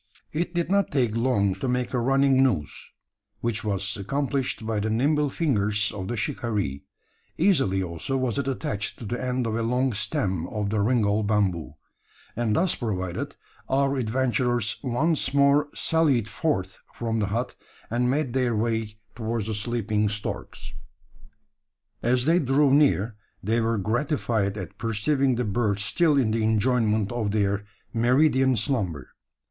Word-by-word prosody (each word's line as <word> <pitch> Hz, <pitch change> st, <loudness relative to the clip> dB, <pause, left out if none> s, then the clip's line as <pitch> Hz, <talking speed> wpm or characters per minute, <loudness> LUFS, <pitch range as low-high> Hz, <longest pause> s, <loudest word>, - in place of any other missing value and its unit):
It 175 Hz, +3 st, -2 dB
did 175 Hz, +1 st, 0 dB
not 200 Hz, -1 st, +3 dB
take 125 Hz, -6 st, +1 dB
long 115 Hz, -5 st, +2 dB
to 135 Hz, -, -2 dB
make 125 Hz, 0 st, -1 dB
a 125 Hz, -, +1 dB
running 135 Hz, +2 st, +3 dB
noose, 95 Hz, -, 0 dB, 0.5 s
which 115 Hz, -2 st, -1 dB
was 100 Hz, -1 st, -1 dB
accomplished 130 Hz, +2 st, -2 dB
by 110 Hz, -1 st, -1 dB
the 105 Hz, +2 st, -1 dB
nimble 145 Hz, +6 st, +2 dB
fingers 110 Hz, -9 st, 0 dB
of 95 Hz, -3 st, -5 dB
the 120 Hz, -, -3 dB
shikaree. 105 Hz, -, -2 dB, 0.6 s
Easily 135 Hz, -, +2 dB
also 90 Hz, +10 st, -3 dB
was 130 Hz, -1 st, -1 dB
it 140 Hz, -, -2 dB
attached 130 Hz, -5 st, -3 dB
to 115 Hz, -, -8 dB
the 120 Hz, +5 st, -3 dB
end 125 Hz, -1 st, -1 dB
of 115 Hz, -, -1 dB
a 115 Hz, -, 0 dB
long 125 Hz, +2 st, +1 dB
stem 95 Hz, -, -1 dB
of 105 Hz, 0 st, -3 dB
the 110 Hz, -, 0 dB
ringall 105 Hz, -1 st, +2 dB
bamboo; 100 Hz, -8 st, 0 dB, 0.6 s
and 110 Hz, -2 st, 0 dB
thus 180 Hz, 0 st, +2 dB
provided, 95 Hz, -7 st, -3 dB, 0.3 s
our 135 Hz, +1 st, +2 dB
adventurers 120 Hz, -2 st, 0 dB
once 140 Hz, +3 st, 0 dB
more 140 Hz, +1 st, +4 dB
sallied 145 Hz, -9 st, +2 dB
forth 100 Hz, -, -2 dB, 0.2 s
from 115 Hz, -1 st, -2 dB
the 105 Hz, -, 0 dB
hut; 115 Hz, +5 st, -2 dB, 0.4 s
and 125 Hz, +1 st, +1 dB
made 135 Hz, -2 st, 0 dB
their 125 Hz, -3 st, +1 dB
way 110 Hz, -1 st, -1 dB, 0.2 s
towards 115 Hz, -2 st, -2 dB
the 110 Hz, -, -2 dB
sleeping 105 Hz, -1 st, 0 dB
storks. 105 Hz, 0 st, -5 dB, 1.3 s
As 125 Hz, +1 st, +2 dB
they 165 Hz, +3 st, +4 dB
drew 135 Hz, 0 st, +3 dB
near, 120 Hz, -7 st, +3 dB, 0.3 s
they 115 Hz, +4 st, +1 dB
were 115 Hz, 0 st, +1 dB
gratified 110 Hz, -2 st, 0 dB
at 95 Hz, -, -7 dB
perceiving 125 Hz, +4 st, +1 dB
the 125 Hz, 0 st, -1 dB
birds 105 Hz, -1 st, 0 dB
still 160 Hz, 0 st, +3 dB
in 120 Hz, -5 st, +2 dB
the 115 Hz, 0 st, 0 dB
enjoyment 110 Hz, -1 st, +2 dB
of 120 Hz, -4 st, -1 dB
their 100 Hz, -1 st, 0 dB, 0.3 s
meridian 130 Hz, +2 st, +3 dB
slumber. 100 Hz, -, -2 dB
115 Hz, 155 wpm, -25 LUFS, 105-135 Hz, 1.3 s, more